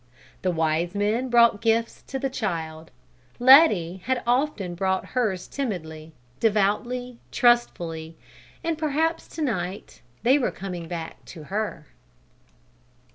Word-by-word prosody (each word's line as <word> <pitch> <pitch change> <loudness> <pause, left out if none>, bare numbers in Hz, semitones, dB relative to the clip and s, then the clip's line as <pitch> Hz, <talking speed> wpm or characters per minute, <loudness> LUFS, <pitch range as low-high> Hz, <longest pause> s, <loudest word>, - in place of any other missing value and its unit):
The 185 - 0
Wise 165 +2 0
Men 215 +5 0
brought 235 -3 +5
gifts 230 0 +1
to 270 - -4
the 270 - -1
Child; 165 -8 -4 0.5
Letty 245 - +6
had 260 -1 0
often 240 -7 0
brought 190 +1 -1
hers 215 -8 0
timidly, 160 - -5 0.3
devoutly, 230 +4 0
trustfully, 165 -10 +1 0.5
and 330 -1 -2
perhaps 320 +2 0
to 320 - -5
night 190 -7 -4 0.2
they 265 +4 +5
were 255 - +1
coming 180 -4 -6
back 165 -1 -7
to 160 -4 -10
her! 210 -7 -3
210 Hz, 120 wpm, -25 LUFS, 175-250 Hz, 0.5 s, Letty